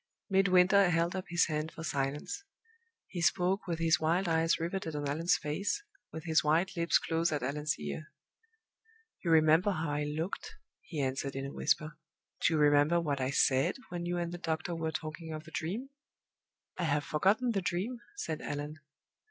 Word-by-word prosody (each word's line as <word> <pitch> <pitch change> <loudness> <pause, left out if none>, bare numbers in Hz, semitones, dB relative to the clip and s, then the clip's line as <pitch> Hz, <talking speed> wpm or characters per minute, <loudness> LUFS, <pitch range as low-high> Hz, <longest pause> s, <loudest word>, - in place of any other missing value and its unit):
Midwinter 190 0 +5
held 170 +1 +1
up 185 - -3
his 170 -1 +3
band 155 0 -2
for 160 - -8
silence. 145 - -2 0.6
He 175 - -5
spoke 180 +3 +2
with 170 -2 -1
his 165 -1 +3
wild 170 +4 +1
eyes 165 0 +2
riveted 165 -1 -3
on 145 -1 -2
Allan's 165 +5 +2
face, 195 - -2 0.3
with 160 - -7
his 160 -2 +2
white 165 +6 +2
lips 170 -1 +3
close 165 0 0
at 145 -4 -1
Allan's 150 +3 -1
ear. 75 - -6 1.1
"You 170 - -1
remember 160 +4 +5
how 165 -6 -1
I 145 0 -1
looked," 160 +6 -4 0.3
he 155 -5 -4
answered, 135 +1 -2
in 135 0 -3
a 140 - -6
whisper. 155 0 0 0.4
"Do 160 - +3
you - - +2
remember 145 +3 +5
what 145 -5 -1
I 130 - 0
said 135 -1 +3
when 175 0 -4
you 175 0 -1
and 170 -1 -2
the 175 - -6
doctor 165 +1 -2
were 160 -1 -2
talking 160 +1 -5
of 155 0 -6
the 160 - -13
Dream?" 205 - -4 0.9
"I 175 - +1
have 145 -1 +1
forgotten 200 - +2
the 200 -3 0
Dream," 190 +8 -2 0.2
said 160 - -4
Allan. 145 +1 -5
160 Hz, 180 wpm, -32 LUFS, 150-175 Hz, 1.1 s, Midwinter